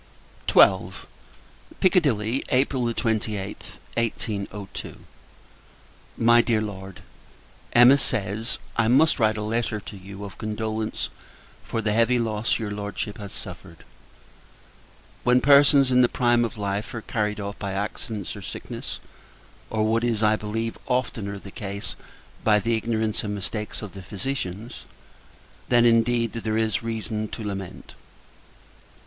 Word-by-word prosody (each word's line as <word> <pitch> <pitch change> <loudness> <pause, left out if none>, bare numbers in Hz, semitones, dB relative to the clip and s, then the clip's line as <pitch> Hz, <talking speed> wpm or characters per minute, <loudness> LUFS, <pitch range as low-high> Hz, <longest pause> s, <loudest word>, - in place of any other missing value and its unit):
XII. - - +5 0.9
Piccadilly, 135 - +2
April 130 -2 +2
28th, 110 -4 -2 0.2
1802. 105 -3 -3 1.2
MY 120 +1 +6
DEAR 115 -2 +1
LORD, 95 -3 -6 0.7
Emma 125 +4 +8
says 110 -1 -1 0.2
I 115 -1 +3
must 145 +6 +5
write 110 -2 +3
a 105 - -3
letter 110 0 -1
to 105 - -10
you, 100 +1 -9
of 100 - -10
condolence 110 0 -2 0.5
for 115 - -3
the 105 -1 +1
heavy 115 +3 +4
loss 110 -1 0
your 110 -3 -4
Lordship 105 0 -4
has 100 -1 -7
suffered. 90 -2 -10 1.4
When 125 +1 +5
persons, 140 0 +6
in 125 0 +6
the 120 - +5
prime 120 -1 +3
of 115 0 -6
life, 100 +1 -2
are 115 - -4
carried 105 -2 -1
off 100 0 -5
by 100 -1 -3
accidents 105 0 -4
or - - -8
sickness - - -6 0.7
or 110 -1 0
what 115 +2 +2
is, 115 -2 +1
I 105 0 +5
believe, 110 +2 -3
oftener 115 -6 -1
the 100 0 -10
case, 100 0 -5 0.5
by 105 -1 +5
the 115 +2 +1
ignorance 110 -1 -1
and 105 -1 -2
mistakes 105 +2 -4
of 105 - -7
the 100 - -8
physicians 100 - -5 0.8
then, 120 -1 +5
indeed, 115 0 +3
there 110 -1 -2
is 110 0 +1
reason 110 -1 -3
to 110 - -7
lament! 100 -3 -6
110 Hz, 130 wpm, -25 LUFS, 105-120 Hz, 1.4 s, Emma